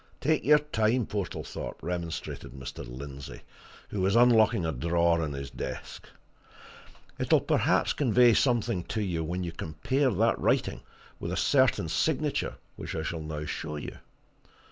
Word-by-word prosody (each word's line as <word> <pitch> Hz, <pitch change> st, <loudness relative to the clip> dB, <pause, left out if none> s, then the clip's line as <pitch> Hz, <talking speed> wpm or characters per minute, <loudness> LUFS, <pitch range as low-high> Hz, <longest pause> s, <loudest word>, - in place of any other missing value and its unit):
"Take 155 Hz, +2 st, +1 dB
your 150 Hz, +1 st, +7 dB
time, 120 Hz, -5 st, +1 dB
Portlethorpe," 100 Hz, -3 st, -5 dB
remonstrated 85 Hz, -7 st, -4 dB
Mr. 65 Hz, -1 st, -7 dB
Lindsey, 70 Hz, +2 st, -8 dB, 0.5 s
who 100 Hz, -, -3 dB
was 95 Hz, +3 st, +2 dB
unlocking 115 Hz, -5 st, +5 dB
a 80 Hz, -, 0 dB
drawer 85 Hz, +4 st, +2 dB
in 75 Hz, -2 st, -3 dB
his 70 Hz, 0 st, -6 dB
desk. -, -, -7 dB, 1.1 s
"It'll -, -, +4 dB
perhaps -, -, +2 dB
convey 125 Hz, -3 st, +5 dB
something 115 Hz, -8 st, +1 dB
to 110 Hz, -, -2 dB
you 85 Hz, -4 st, -1 dB
when 90 Hz, +3 st, -3 dB
you 85 Hz, -, -3 dB
compare 85 Hz, -, 0 dB
that 115 Hz, +3 st, +2 dB
writing -, -, +1 dB, 0.4 s
with -, -, -4 dB
a -, -, -2 dB
certain -, -, +3 dB
signature -, -, 0 dB, 0.2 s
which -, -, -6 dB
I 80 Hz, -, -2 dB
shall 80 Hz, +1 st, -3 dB
now 75 Hz, -1 st, -5 dB
show 75 Hz, 0 st, -4 dB
you. 75 Hz, -, -7 dB
90 Hz, 145 wpm, -28 LUFS, 80-115 Hz, 1.1 s, your